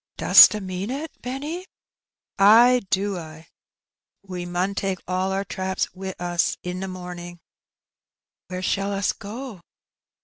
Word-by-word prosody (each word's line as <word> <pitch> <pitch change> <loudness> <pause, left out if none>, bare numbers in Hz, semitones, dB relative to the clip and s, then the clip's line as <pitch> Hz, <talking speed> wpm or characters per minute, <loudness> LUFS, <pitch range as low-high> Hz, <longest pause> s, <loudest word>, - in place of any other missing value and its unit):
"Dost - - +8
'a 210 - -4
mean 185 +2 -5
it, 290 +5 -4
Benny?" 295 +9 -5 0.7
"Ay 235 +5 +7
do 195 -1 0
I. 160 0 -11 0.8
We 180 -2 -6
mun 180 +3 -1
take 195 -1 -2
all 185 +1 -1
our 195 +1 -2
traps 190 0 -3
wi' 190 0 -6
us 175 -1 -1
i' 180 - -2
t' 185 +1 -5
morning." 180 -1 -8 1.1
"Where 185 0 -6
shall 195 +2 -1
us 200 0 0
go?" 220 -1 -8
190 Hz, 135 wpm, -23 LUFS, 180-210 Hz, 1.1 s, Dost